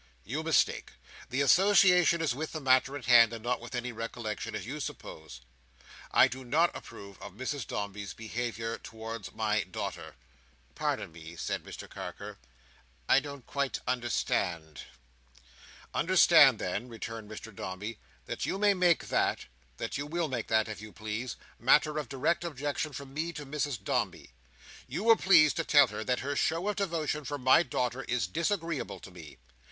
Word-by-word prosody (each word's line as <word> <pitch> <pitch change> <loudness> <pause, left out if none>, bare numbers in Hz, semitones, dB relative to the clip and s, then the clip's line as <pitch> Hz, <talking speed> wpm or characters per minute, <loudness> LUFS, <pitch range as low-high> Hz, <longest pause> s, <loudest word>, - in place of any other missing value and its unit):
You 140 +8 -3
mistake. 160 -1 +1 0.4
The 130 +2 0
association 180 +1 +5
is 155 - +1
with 155 +5 -5
the 155 - -3
matter 135 0 +3
in 140 - -10
hand, 115 -1 +6
and 115 -1 -7
not 125 0 -1
with 120 +2 -7
any 125 0 -3
recollection, 115 -1 -5
as 110 - -5
you 145 +6 -5
suppose. 80 - -8 0.7
I - - +6
do 130 +1 -7
not 155 +8 +2
approve 100 -1 -10
of - - -9
Mrs 135 +2 -4
Dombey's 100 -2 -5
behaviour 115 0 -4
towards 115 -1 -7
my 110 -1 0
daughter." 95 - -6 0.6
"Pardon - - -2
me," 80 +1 -11
said - - -3
Mr - - -9
Carker, - - -8 0.7
"I - - +6
don't 140 -2 -9
quite 140 -1 -2
understand." 90 - -1 1.1
"Understand - - +6
then," 120 +5 -3
returned 115 -1 -7
Mr 110 0 -9
Dombey, 105 +5 -6 0.3
"that - - -4
you - - -1
may 205 0 +4
make 180 -3 +2
that—that - - -2
you 145 - -4
will 165 0 -1
make 120 -4 -3
that, 110 -1 +2
if 105 -3 -7
you 110 0 -9
please—matter 120 +7 0
of 145 - -6
direct 145 +6 0
objection 145 -1 -3
from 135 0 -9
me 160 +3 -2
to 150 -2 -7
Mrs 140 -6 -3
Dombey. - - -2 0.6
You - - -4
will 225 0 +7
please 165 -8 +5
to 165 - -1
tell 145 -3 +6
her 105 +1 -5
that 125 - 0
her 145 +2 -2
show 165 +8 0
of 210 - -2
devotion 160 -6 -1
for 145 +1 -4
my 130 +3 +5
daughter 125 -3 -2
is 120 -4 0
disagreeable 165 - -2
to 95 - -12
me. 80 -5 -12
125 Hz, 165 wpm, -30 LUFS, 110-150 Hz, 1.1 s, will